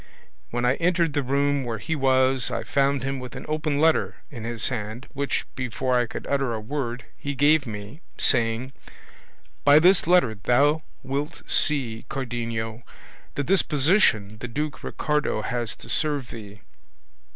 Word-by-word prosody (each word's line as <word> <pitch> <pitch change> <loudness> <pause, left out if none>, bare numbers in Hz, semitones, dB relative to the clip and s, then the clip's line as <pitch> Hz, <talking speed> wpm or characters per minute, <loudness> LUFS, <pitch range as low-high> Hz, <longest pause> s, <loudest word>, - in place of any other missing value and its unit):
When 120 +1 -1
I 125 +2 +3
entered 170 -2 +1
the 145 - +1
room 140 +1 +1
where 115 -2 -3
he 160 +9 -3
was 130 -2 +3
I - - -3
found 140 -1 +1
him 135 0 -2
with 125 -1 -8
an - - -7
open 155 -1 -1
letter 160 +1 +3 0.2
in 115 -5 -7
his 115 -2 0
hand, 110 +5 -5
which, 140 0 -1
before 130 +1 -2
I 120 -1 +2
could - - -7
utter 135 -4 0
a - - -3
word, 125 +1 -4
he 140 0 -5
gave 145 +1 +4
me, 105 +7 -8 0.2
saying, 120 +1 +1 0.9
'By 145 +1 +7
this 180 +2 +5
letter 175 -10 +4
thou 140 +9 +2 0.2
wilt 140 +5 -4
see, 125 -7 +1
Cardenio, 115 -3 -3 0.5
the 145 - -1
disposition 145 - +2
the 125 - -5
Duke 150 +5 -4
Ricardo 150 -7 -1
has 120 -3 -2
to - - -14
serve 145 -5 0
thee. 105 -2 -10
135 Hz, 155 wpm, -25 LUFS, 115-145 Hz, 0.9 s, By